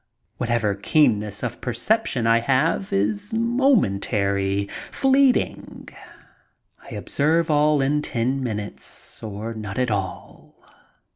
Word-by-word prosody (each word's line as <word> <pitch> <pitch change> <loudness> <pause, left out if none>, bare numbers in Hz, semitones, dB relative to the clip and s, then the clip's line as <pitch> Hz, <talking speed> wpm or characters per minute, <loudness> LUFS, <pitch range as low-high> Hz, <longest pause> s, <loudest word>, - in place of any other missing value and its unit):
Whatever 115 -4 0
keenness 105 -2 +1
of - - -4
percep 130 - 0
tion 120 -3 -1
I 115 0 +4
have 135 +10 +1
is 100 +1 -1
momentary, 100 - +1 0.2
fleeting. 270 -1 +1 0.9
I - - -10
observe 160 +3 +1
all 150 -1 +3
in 150 +2 +1
ten 130 0 -1
minutes 105 -4 -6
or 110 +1 -5
not 105 -2 -6
at 125 -2 +1
all. 95 -3 -5
120 Hz, 110 wpm, -23 LUFS, 105-150 Hz, 0.9 s, I